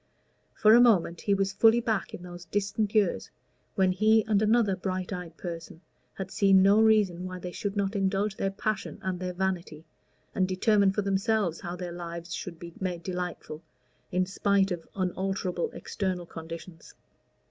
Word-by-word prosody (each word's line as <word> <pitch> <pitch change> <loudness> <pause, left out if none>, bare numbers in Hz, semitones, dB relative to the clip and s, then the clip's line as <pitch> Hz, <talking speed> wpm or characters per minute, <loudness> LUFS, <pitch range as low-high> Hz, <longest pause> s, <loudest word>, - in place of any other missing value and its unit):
For 215 0 +6
a 240 - +8
moment 180 -8 +3
he 200 - +2
was 195 0 0
fully 225 +3 +5
back 225 -2 -1
in 175 - -8
those 175 -1 -9
distant 205 +2 -1
years 205 -5 +2 0.5
when 190 -2 +3
he 215 +3 +3
and 210 -2 +2
another 215 -2 +3
bright 185 0 -3
eyed 175 -3 -7
person 165 -2 -7 0.3
had 190 0 -6
seen 195 -2 +5
no 200 +3 +5
reason 205 -5 +3
why 185 0 -6
they 180 0 -6
should 205 +2 -4
not 200 +1 0
indulge 195 +1 0
their 195 - -1
passion 215 +2 -3
and 185 -1 -2
their 180 0 -3
vanity, 175 -4 -3 0.5
and 185 - +1
determine 200 +1 +3
for 210 +1 -1
themselves 195 -2 0
how 175 0 -5
their 180 -1 -6
lives 170 -1 -6
should 170 -3 -6
be 170 0 -10
made 180 -3 -3
delightful 180 -4 -5 0.5
in 185 0 +1
spite 195 +1 +1
of 170 -2 -4
unalterable 185 -1 -2
external 185 -3 -3
conditions. 165 +1 -10
190 Hz, 170 wpm, -28 LUFS, 175-205 Hz, 0.5 s, a